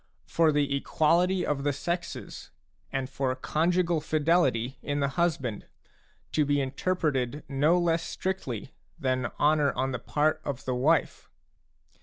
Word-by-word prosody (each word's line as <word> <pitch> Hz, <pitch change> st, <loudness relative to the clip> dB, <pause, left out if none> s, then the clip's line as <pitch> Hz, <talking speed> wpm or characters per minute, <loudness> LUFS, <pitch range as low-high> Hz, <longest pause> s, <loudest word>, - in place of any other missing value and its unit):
for 165 Hz, -2 st, +3 dB
the 145 Hz, -1 st, +1 dB
equality 175 Hz, +6 st, +2 dB
of 140 Hz, -2 st, -1 dB
the 145 Hz, -, +2 dB
sexes 170 Hz, +5 st, -5 dB, 0.4 s
and 135 Hz, -1 st, -2 dB
for 135 Hz, -1 st, -1 dB
conjugal 170 Hz, +4 st, +1 dB
fidelity 145 Hz, -6 st, +1 dB
in 145 Hz, 0 st, -2 dB
the 140 Hz, -1 st, +1 dB
•husband, 140 Hz, -, -1 dB, 0.7 s
to 155 Hz, -, +2 dB
be 145 Hz, 0 st, +1 dB
interpreted 140 Hz, -1 st, -1 dB
no 145 Hz, +5 st, +3 dB
less 170 Hz, -1 st, +2 dB
strictly 150 Hz, -, -4 dB, 0.2 s
than 130 Hz, -5 st, 0 dB
honour 150 Hz, -1 st, +3 dB
on 135 Hz, +1 st, -1 dB
the 125 Hz, -, -3 dB
part 155 Hz, +1 st, 0 dB
of 135 Hz, -2 st, -5 dB
the 130 Hz, -, -1 dB
wife. 140 Hz, +4 st, +1 dB
145 Hz, 135 wpm, -28 LUFS, 135-165 Hz, 0.7 s, for